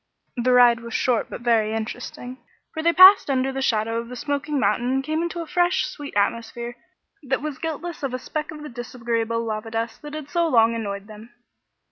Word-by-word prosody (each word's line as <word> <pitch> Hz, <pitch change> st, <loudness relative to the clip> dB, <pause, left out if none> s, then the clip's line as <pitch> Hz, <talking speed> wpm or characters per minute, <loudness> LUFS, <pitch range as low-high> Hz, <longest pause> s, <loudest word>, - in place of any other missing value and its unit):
The 250 Hz, 0 st, +1 dB
ride 245 Hz, -1 st, +6 dB
was 235 Hz, -1 st, -7 dB
short 245 Hz, -3 st, +1 dB
but -, -, -7 dB
very 225 Hz, -2 st, +2 dB
interesting, 245 Hz, +3 st, -6 dB, 0.3 s
for 315 Hz, -, -3 dB
they 335 Hz, +1 st, +3 dB
passed 370 Hz, 0 st, +8 dB
under 265 Hz, 0 st, +1 dB
the 270 Hz, 0 st, -4 dB
shadow 225 Hz, -2 st, 0 dB
of 230 Hz, 0 st, -7 dB
the 250 Hz, -, -7 dB
smoking 285 Hz, +2 st, -2 dB
mountain 245 Hz, -1 st, +1 dB
and 270 Hz, 0 st, 0 dB
came 310 Hz, +3 st, -1 dB
into 340 Hz, 0 st, -3 dB
a -, -, -5 dB
fresh, 355 Hz, +1 st, +1 dB
sweet 290 Hz, -6 st, -8 dB
atmosphere 230 Hz, +3 st, -1 dB, 0.5 s
that 265 Hz, -1 st, -2 dB
was 300 Hz, -3 st, -5 dB
guiltless 325 Hz, +1 st, -5 dB
of 275 Hz, -3 st, -2 dB
a 255 Hz, -, -2 dB
speck 300 Hz, +4 st, -5 dB
of 300 Hz, -1 st, -8 dB
the 300 Hz, -, -7 dB
disagreeable 230 Hz, -1 st, -3 dB
lava 215 Hz, 0 st, -4 dB
dust 225 Hz, 0 st, -4 dB
that 295 Hz, 0 st, -8 dB
had 305 Hz, -2 st, -6 dB
so 340 Hz, +1 st, +1 dB
long 230 Hz, -5 st, +4 dB
annoyed 200 Hz, -3 st, -4 dB
them. 215 Hz, +2 st, -12 dB
250 Hz, 205 wpm, -23 LUFS, 230-300 Hz, 0.5 s, passed